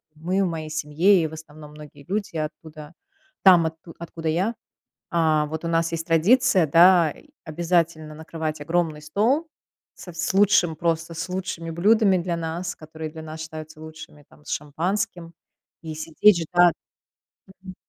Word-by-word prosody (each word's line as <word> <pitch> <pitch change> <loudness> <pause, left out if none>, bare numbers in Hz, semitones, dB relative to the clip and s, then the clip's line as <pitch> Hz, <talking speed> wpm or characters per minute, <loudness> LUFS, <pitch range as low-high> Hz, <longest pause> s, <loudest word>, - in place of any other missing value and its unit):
мы 180 +5 -1
в - - +1
моей 160 -2 -5
семье 155 +5 +2
и, - - 0
в 155 - -12
основном, 155 -1 -11
многие 150 -1 -13
люди 200 -3 -3
оттуда, 155 0 -7 0.5
там, 180 -4 +6
отку 160 +1 -7
откуда 165 -1 -5
я. 185 +8 0 0.6
А, 155 -3 +2
вот 160 +2 -6
у - - -2
нас 165 0 +1
есть 165 0 -3
традиция, 190 +4 +3
да, 170 +1 +6
и 300 - -20
обязательно 165 -1 -1
накрывать 160 0 -5
огромный 160 0 -1
стол 225 - 0 0.5
со 175 - -11
вс 165 - -6
с 185 - -1
лучшим, 195 -5 +3
просто 165 0 -2
с 165 +3 -5
лучшими 180 -3 -4
блюдами 195 +3 +3
для 175 0 -2
нас, 170 +2 -4
которые 155 0 -8
для 160 0 -10
нас 155 0 -8
считаются 155 0 -9
лучшими, 160 -1 -11
там, 150 - -22
с - - -10
шампанским, 170 +3 -3 0.5
и 160 -1 -6
сидеть, 165 +4 +3
ждать, 175 +1 +4 0.9
мгм. 185 -1 -9
165 Hz, 160 wpm, -23 LUFS, 155-180 Hz, 0.9 s, там